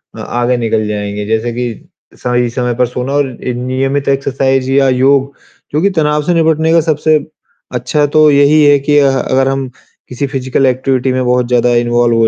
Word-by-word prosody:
अ, - - -10
आगे 120 +1 -1
निकल 110 -2 -1
जाएँगे। 105 0 -4
जैसे 110 +2 -1
कि, 120 -2 -6 0.3
सही 125 0 -1
समय 125 0 -2
पर 125 +1 +1
सोना 125 +3 -4
और 145 -1 +1 0.2
एक 125 -1 -3
नियमित 135 +3 -2
एक्सरसाइज़ 135 -1 0
या 135 0 +3
योग, 135 +2 +2 0.4
जो 150 - +1
कि 200 - +3
तनाव 150 -4 0
से 175 - 0
निपटने 160 -1 +1
का 165 - +4
सबसे 155 0 +1 0.6
अच्छा 145 +5 0
तो 155 +1 +4
यही 145 +2 +4
है 145 -1 +5
कि 145 +1 +1
अ, 140 -1 +3
अगर 135 0 0
हम 135 -1 -2 0.4
किसी 125 +3 -3
फिज़िकल 135 -1 -1
एक्टिविटी 130 0 0
में 130 0 -1
बहुत 125 0 +1
ज़्यादा 125 0 +2
इन्वॉल्व 120 0 +1
हो 115 - +3
130 Hz, 190 wpm, -13 LUFS, 125-145 Hz, 0.6 s, है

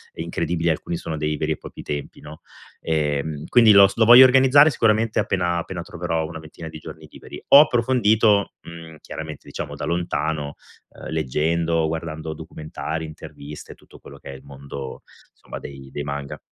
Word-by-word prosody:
incredibili, 85 +1 -2
alcuni 85 +1 -2
sono 80 - -5
dei 75 0 -2
veri 75 +1 -2
e - - -9
propri - - -11
templi, 75 -1 -6
no, 75 +1 -12 0.4
ehm, 75 -1 -2
quindi 115 -3 +6
lo 100 0 +8
s 100 - -8
lo 115 - +3
voglio 120 +3 +10
organizzare 135 +3 +6
sicuramente 115 -2 +1
appena 90 -2 0
appena 85 +1 -6
troverò 85 -2 -3
una 80 0 -8
ventina 80 +1 -11
di 80 -1 -9
giorni - - -11
liberi. - - -12
Ho 140 - +10
approfondito, 115 -6 +2
mhmm, 85 -1 -11
chiaramente, 80 -2 -8
diciamo - - -6
da - - -5
lontano, 80 -3 -2 0.3
ehm, - - -11
leggendo, 80 +2 0
guardando 80 -1 -5
documentari, 80 +1 -6
interviste, 75 -2 -11 0.3
tutto - - -19
quello 70 - -13
che 70 - -12
è - - -9
il 65 - -12
mondo, 70 -1 -9 0.3
insomma, - - -10
dei 70 -1 -10
dei 70 - -5
manga. 70 -1 -6
80 Hz, 170 wpm, -22 LUFS, 75-95 Hz, 0.4 s, voglio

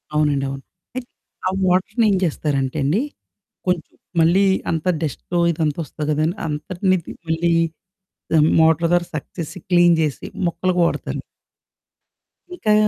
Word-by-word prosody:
అవునండి. 145 -2 +2
అవును. 135 0 -6 0.3
అయితే 255 -1 -5 0.4
ఆ - - +3 0.2
వాటర్నేం 200 +3 +3
చేస్తారంటే 145 -3 -1
అండి, 165 - +2 0.7
కొంచెం 180 -3 -1 0.3
మళ్ళీ 175 +5 +5 0.3
అంత 160 0 -2 0.2
డస్టొ 165 +3 -2
ఇదంతా 155 -1 -1
ఒస్తది 150 +1 -5
కదండి! 155 +5 +1
అంతటినిది 175 +4 -1 0.2
మళ్ళీ 170 +1 +1 1.1
మోటార్ 160 +1 +4
ద్యారా 175 -1 +2
సక్‌ 150 - -5
చేసి 165 +3 -5
క్లీన్ 175 -1 +6
జేసి 150 -3 -1 0.2
మొక్కలకి 180 +1 0
వాడతాను. - - -3 1.3
ఇంకా 215 -11 +2
165 Hz, 115 wpm, -21 LUFS, 150-180 Hz, 1.3 s, క్లీన్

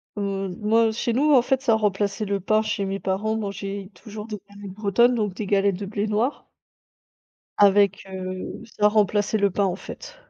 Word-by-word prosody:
Heu, 195 -2 -2
moi 225 +1 +3
chez 235 +2 -2
nous, 295 +5 +3
en 255 - +7
fait, 260 +2 0
ça 235 - +3
remplaçait 205 0 0
le 200 0 -1
pain 215 +3 +2
chez 215 -2 -2
mes 195 +1 -3
parents, 195 +3 -1
on - - -1
mangeait 200 -1 -5
toujours 210 +2 -9
des 210 -2 -6
galettes 200 -1 -10
bretonnes, 215 +4 +3
donc 210 -4 -1
des 210 - -5
galettes 200 -1 +2
de 200 - -4
blé 205 +1 -2
noir 220 +7 -1 1.1
avec, 200 -1 +4
heu, 185 0 -6 0.2
ça 210 - +6
remplaçait 210 0 +2
le 200 -1 +2
pain, 200 +2 +1
en 180 -2 -1
fait. - - -10
205 Hz, 190 wpm, -24 LUFS, 195-220 Hz, 1.1 s, en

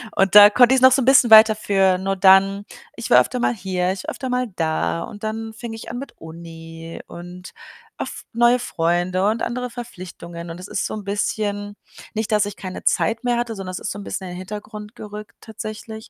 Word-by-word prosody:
Und 195 +1 +1
da 205 0 +11
konnte 245 +4 +5
ich's 260 - +1
noch 260 - +8
so 265 +1 +3
'n - - -1
bisschen 260 -3 +5
weiter 220 0 +9
führen 195 -2 +1
und 195 0 -2
dann 195 +1 +5 0.3
ich - - -6
war - - +7
öfter 250 - -3
mal 240 - +1
hier, 185 -2 -2
ich 190 0 -6
war - - -4
öfter 260 -2 -6
mal 250 0 -1
da 85 - -1
und 205 +1 -11
dann 220 +1 -4
fing 225 0 -8
ich 225 - -9
an 240 - -6
mit 275 - -9
Uni 165 0 -10
und 175 +1 -10 0.5
oft - - -7
neue 240 +1 +3
Freunde 175 0 0
und 225 +2 -1
andere 250 +1 -3
Verpflichtungen 175 -7 -9
und 170 - -9
es 185 - -9
ist - - -3
so - - -4
'n 210 -2 -6
bisschen 205 0 -3 0.4
nicht, 220 0 -3
dass 210 -1 +2
ich 205 - -6
keine 185 -2 -8
Zeit 230 +3 0
mehr 240 -1 0
hatte, 240 -2 -3
sondern 190 -2 -6
es 180 - -5
ist - - -5
so 205 - -7
'n - - -8
bisschen 190 -1 -5
in 180 - -7
den 180 - -7
Hintergrund 210 +3 -9
gerückt 210 -2 -10
tatsächlich. 220 0 -8
205 Hz, 225 wpm, -21 LUFS, 185-225 Hz, 0.5 s, da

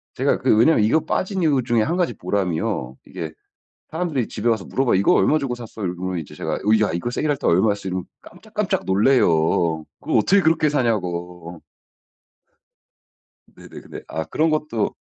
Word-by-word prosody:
제가 - - +1
그 - - +3
왜냐하면 120 0 +4
이거 120 +10 +3
빠진 190 0 -1
이유 145 -5 +2
중에 120 -2 +2
1 165 +9 -1
가지 180 -2 0
보람이요. 80 -9 -2
이게 80 -2 -6 0.6
사람들이 160 -7 -2
집에 110 +2 -2
와서 110 -5 +1
물어봐요. 135 -2 0
"이거 95 +2 +3
얼마 150 +11 +3
주고 135 -4 -3
샀어?" 115 -3 -8
이러면은 90 0 -3
이제 80 - -8
제가 - - -3
"어 - - -3 0.2
야 105 - +2
이거 85 +8 -3
세일할 145 +3 -1
때 - - -4
얼마였어." 100 +2 +2
이러면 90 -1 -3 0.2
깜짝깜짝 - - -4
놀라요. 85 - +2 0.2
그거 - - -3
어떻게 195 - +4
그렇게 160 -1 +3
사냐고. 90 - -2 1.9
네네. - - -16
근데 - - -10
아 80 - -3
그런 160 +1 0
것도 150 -8 -1
110 Hz, 370 characters per minute, -21 LUFS, 90-145 Hz, 1.9 s, 왜냐하면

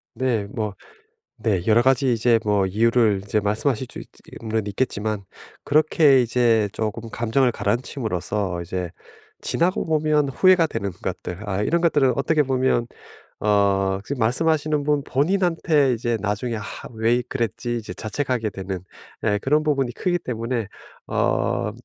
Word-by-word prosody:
네. 115 -4 0
뭐 105 -1 -4 0.7
네 95 -6 0
여러 110 +2 +5
가지 130 +1 +3
이제 115 +1 +3
뭐 105 -3 +2
이유를 110 0 +2
이제 105 +1 0
말씀하실 110 +5 -1
쭈 - - -9
있쯔 - - -11 0.3
있는 110 -2 -2
있겠지만 105 -1 -2 0.4
그렇게 150 -2 +4
이제 115 -3 +2
쪼금 110 +1 -4
감정을 120 +2 +1
가라앉힘으로써 105 -7 -2
이제 90 0 -4 0.5
지나고 180 +3 0
보면 155 -2 +2
후회가 180 +4 +4
되는 100 -8 -3
것들 90 +3 -6
아 100 +1 -1
이런 170 +10 +1
것들은 145 -6 +3
어떻게 150 +2 +2
보면 130 -3 +1 0.5
어 100 -2 +2
지금 140 -2 -4
말씀하시는 155 +5 +2
분 145 -1 +1
본인한테 160 -2 +2
이제 115 0 -1
나중에 105 +4 -2
'하. 110 -2 -7
왜 115 +2 +2
그랬지.' 120 -1 -2
이제 105 -5 -6
자책하게 115 +2 -2
되는 95 -2 -5 0.4
예 105 - +2
그런 150 +3 +2
부분이 140 -5 0
크기 175 +4 -1
때문에 115 - -3 0.4
어 - - 0
120 Hz, 310 characters per minute, -23 LUFS, 105-140 Hz, 0.7 s, 여러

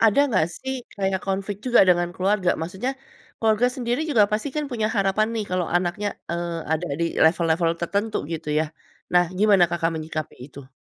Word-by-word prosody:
Ada 225 +4 +5
nggak 175 -6 +3
sih 265 +8 -5 0.2
kayak 190 -1 0
konflik 195 +1 -3
juga 240 -5 +6
dengan 175 -1 +3
keluarga? 190 -1 +2
Maksudnya 190 +11 -3 0.4
keluarga 225 +2 +2
sendiri 245 0 -2
juga 220 -8 +5
pasti 220 +7 0
kan 300 - 0
punya 220 -3 0
harapan 195 +2 +2
nih 220 - -1
kalau 180 -1 0
anaknya, 180 +4 0 0.2
eee, 170 -1 -3
ada 165 +2 -1
di 170 - +2 0.2
level-level 165 0 +3
tertentu 200 +5 -1 0.2
gitu 160 -1 -5
ya, 160 - +2 0.5
nah 175 0 +5
gimana 200 -3 +5
Kakak 170 -1 0
menyikapi 155 -1 -5
itu? 140 -2 -13
190 Hz, 170 wpm, -23 LUFS, 170-215 Hz, 0.5 s, juga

